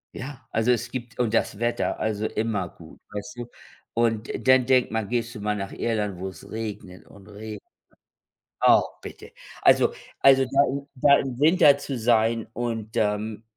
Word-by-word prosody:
Ja, 130 -2 -8
also 115 +2 +2
es 120 0 0
gibt 125 -1 -7
und 120 -3 0
das 105 -2 0
Wetter, 120 0 -1
also 110 -1 -1
immer 105 -6 -2
gut, 80 -1 -16
weißt 105 +3 -7
du? 120 0 -6 0.4
Und 115 -1 0 0.2
dann 130 -1 +6
denkt 130 -2 +3
man, 110 -2 -2
gehst 120 0 -2
du 105 - -7
mal 105 0 -1
nach 100 -1 -5
Irland, 105 -5 -2
wo 95 +1 -4
es 95 - -13
regnet 105 -4 -7
und 100 -1 -16
reg 105 0 -8 1.0
Ah, - - +6 0.2
bitte. - - -10 0.3
Also - - +4 0.3
also, 135 -1 +6
da 135 +2 +3 0.3
da 140 +2 +5
im 130 -2 -4
Winter 150 -2 +6
zu 140 -2 -5
sein 115 -1 +2
und, 115 -3 -4
ähm, 105 +1 -1
115 Hz, 170 wpm, -25 LUFS, 105-125 Hz, 1.0 s, dann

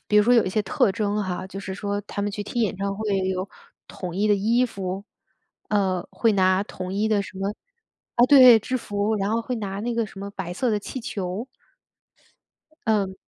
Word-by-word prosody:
比 210 - +3
如 210 - +7
说 245 +2 +5
有 230 - +5
一 185 - -2
些 215 - +1
特 195 0 +2
征 210 +1 -1
哈， 185 -1 -4
就 195 +1 -7
是 190 - -6
说 200 +1 -3
她 205 0 -6
们 205 0 -1
去 205 - -4
听 235 +4 -3
演 205 -4 0
唱 195 +1 -2
会 210 -2 -1
有 185 +1 -2 0.4
统 180 -2 -7
一 205 +2 +2
的 210 - +4
衣 230 +5 +2
服， 195 -3 -5 0.6
嗯， 190 -4 +1
会 225 -2 +2
拿 185 -1 +3
统 185 -2 -6
一 205 +2 0
的 210 -2 +2
什 190 - -10
么 195 +1 -1 0.6
啊， 240 - +6
对， 255 -4 +9
制 255 +4 -2
服。 205 -2 -1
然 200 0 -1
后 225 +1 +1
会 250 +2 -3
拿 200 -3 -4
那 235 +2 -2
个 230 0 +1
什 195 - -11
么 200 +1 -5
白 190 -3 -5
色 245 +8 -1
的 210 - +1
气 260 - -6
球。 200 0 -4 1.4
嗯。 200 -4 +1
205 Hz, 230 characters per minute, -24 LUFS, 190-220 Hz, 1.4 s, 对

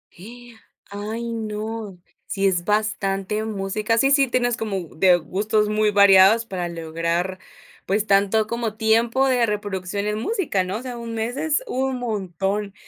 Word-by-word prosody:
¡Y! 240 +5 -12 0.4
Ay, 220 +3 -5
no. 215 -2 -5 0.3
Sí, 195 0 0
es 180 -2 0
bastante 210 -1 -1
música. 215 +1 -1
Sí 270 +4 +3
sí, 275 -1 +5
tienes 245 -1 0
como 195 -7 -4
de 180 +2 +5
gustos 210 +6 0
muy 215 0 +2
variados 200 +2 +6
para 185 -5 -4
lograr, 170 +2 -2 0.5
pues 205 +3 +1
tanto 200 +2 +3
como 230 -2 -3
tiempo 230 +4 +2
de 250 -3 +3
reproducción 200 -1 -3
en 210 0 -1
música, 295 - -1
¿no? 185 +3 -3
O 230 - -7
sea, 250 -2 -6
un 230 -1 -6
mes 225 +3 -2
es 315 +7 0
un 265 0 -1
montón. 200 -2 -3
210 Hz, 155 wpm, -22 LUFS, 195-230 Hz, 0.5 s, variados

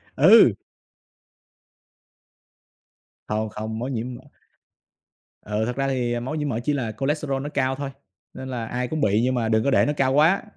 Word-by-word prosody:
Ừ. - - +7 2.8
Không, 110 +1 -1
không, 110 +1 -5
máu 125 +3 -3
nhiễm 125 -1 -4
mỡ - - -10 1.3
ờ, 105 +1 -1
thật 120 +1 -3
ra 135 0 -1
thì, 125 -3 -1
ờ, 120 - -1
máu 130 +6 -4
nhiễm 150 -2 -2
mỡ 115 -3 -2
chỉ 150 - 0
là 125 -6 -2
cholesterol 140 -1 -1
nó 145 - -4
cao 135 -2 0
thôi, 140 0 -5 0.4
nên 130 0 -8
là 120 -3 -4
ai 125 +2 -3
cũng 155 +3 -3
bị 105 +1 +2
nhưng 130 +1 +1
mà 115 -2 0
đừng 110 0 +2
có 140 - +1
để - - +4
nó 150 - 0
cao 135 -2 +1
quá. 160 +7 +4
130 Hz, 185 wpm, -23 LUFS, 115-140 Hz, 2.8 s, Ừ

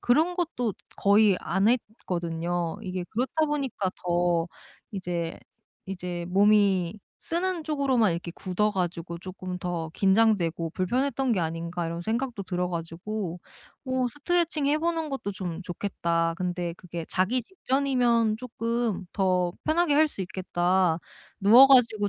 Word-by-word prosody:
그런 315 +9 +3
것도 280 - -1 0.2
거의 200 -1 +4
안 190 +3 0
했거든요. 175 -7 -2
이게 185 -3 -4
그렇다 265 +7 0
보니까 275 -10 -1
더 175 -1 +2 0.5
이제, 175 -4 -3 0.5
이제 180 -2 -5
'몸이 200 -1 +3 0.2
쓰는 345 0 -2
쪽으로만 270 - +2
이렇게 170 +1 -4
굳어 205 +3 0
가지고 175 -3 -3
조금 185 0 -6
더 175 -3 -3
긴장되고 190 -5 +2
불편했던 255 +6 0
게 195 - +1
아닌가.' 170 +1 -3
이런 170 +1 -4
생각도 230 +1 -2
들어 180 -1 -2
가지고 175 +2 -4 0.5
어 255 -1 +1
'스트레칭해보는 320 +2 0
것도 270 -8 -4
좀 185 -2 -5
좋겠다. 170 -2 -1
근데 175 -2 -2
그게 170 -2 -7
자기 215 +7 +1
직전이면 250 - +1
쪼끔 230 -4 -2
더 180 -3 +1
편하게 315 -1 +2
할 310 +2 +5
수 245 - -9
있겠다. 180 -2 +1 0.4
누워 230 +7 +9
가지고 235 -6 +5
195 Hz, 285 characters per minute, -27 LUFS, 175-250 Hz, 0.5 s, 누워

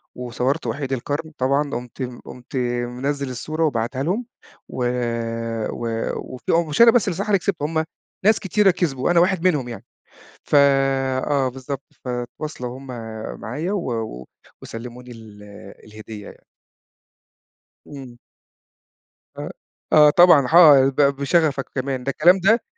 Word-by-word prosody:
وصورت 125 +4 -2
وحيد 140 -2 -3
القرن، 145 +5 -3
طبعًا 140 +3 +1
قُمت 125 0 -7 0.2
قُمت 125 +2 -11 0.3
منزل 140 +3 -3
الصورة 155 +6 -3
وباعتها 130 -1 -1
لهُم، 200 +10 -1 0.4
و - - -9 0.9
و 120 - -5 0.3
وفيه 160 +5 -2
مش 150 - +1
أنا 235 -1 +9
بس 230 -5 +2
اللي 185 - -1
بصراحة 200 +2 +1
كسبت، 180 -3 -3
هُم 160 +2 0 0.4
ناس 215 +1 +5
كتيرة 195 +1 +3
كسبوا، 160 -6 -1
أنا 175 - +4
واحد 180 -1 +2
منهم 140 -9 0
يعني، 115 - -9 0.6
ف - - -1 0.7
آه 135 -3 +1
بالضبط، 135 +2 -6 0.2
فتواصلوا 125 +1 -5
هُم 135 - -13 0.5
معايا 150 - -4
و 185 -11 -2
و 110 - -5 0.3
وسَلَّموني 125 +2 -9
ال 110 -3 -13 0.4
الهدية 110 -1 -10
يعني. - - -17 1.4
امم. 130 -4 -11 1.2
أ - - -5 0.4
آه 150 -1 +8
طبعًا، 160 -5 +6
حا 145 -4 +7
ب 135 - -10
بشغفك 140 +1 +2
كمان، 130 -1 -3
ده 140 - -1
الكلام 175 +7 +4
ده 220 +5 +3
140 Hz, 130 wpm, -21 LUFS, 125-165 Hz, 1.4 s, أنا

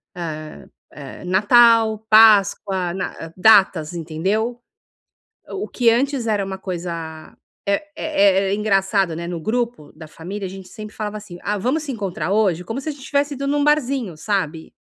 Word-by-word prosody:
eh 155 -3 -7 0.3
eh, 140 +3 -10
Natal, 220 +3 +4
Páscoa, 200 -4 +4
na 165 -3 -6
datas, 190 -6 +4
entendeu? 190 +9 -2 0.9
O 400 +1 -5
que 240 -2 +2
antes 270 +1 0
era 210 -2 +1
uma 190 0 -5
coisa 170 -4 -6 0.3
é 200 +5 +1
é 200 -11 +2
é - - 0
engraçado, 195 -4 +1
né, 170 +1 -5
no 175 -1 -4
grupo 230 -2 -3
da 160 0 -11
família, 190 +6 -7
a - - -8
gente 190 -1 -11
sempre 215 0 -10
falava 215 -1 -4
assim: 195 -4 -10
"Ah, 205 +1 -1
vamos 270 +9 -1
se 285 - -4
encontrar 190 -6 -4
hoje?", 195 -5 +1
como 225 +9 -5
se 310 - -4
a - - -1
gente 280 -2 -12
tivesse 285 0 0
ido 275 - -4
num 290 0 +1
barzinho, 270 - 0
sabe. 165 -5 -3
200 Hz, 165 wpm, -20 LUFS, 175-230 Hz, 0.9 s, Natal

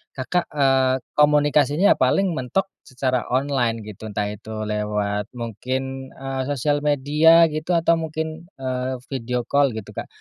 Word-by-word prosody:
Kakak, 165 +7 -1
eee, 135 -2 +2 0.2
komunikasinya 150 +3 +4
paling 180 +9 +2
mentok 160 +7 -2 0.2
secara 130 -2 -1
online 125 -4 0
gitu, 105 +1 -9
entah 105 0 -2
itu 110 +1 -6
lewat 105 -1 -2
mungkin, 130 +3 -4
eee, 135 0 -4
sosial 145 +1 0
media 150 +3 +4
gitu 155 +3 -1
atau 165 0 +3
mungkin, 160 +1 -5
eee, 130 -1 -3 0.2
video 125 -2 -2
call 140 -3 +2
gitu, 110 -3 -7
Kak. - - -6
135 Hz, 135 wpm, -22 LUFS, 120-150 Hz, 0.2 s, komunikasinya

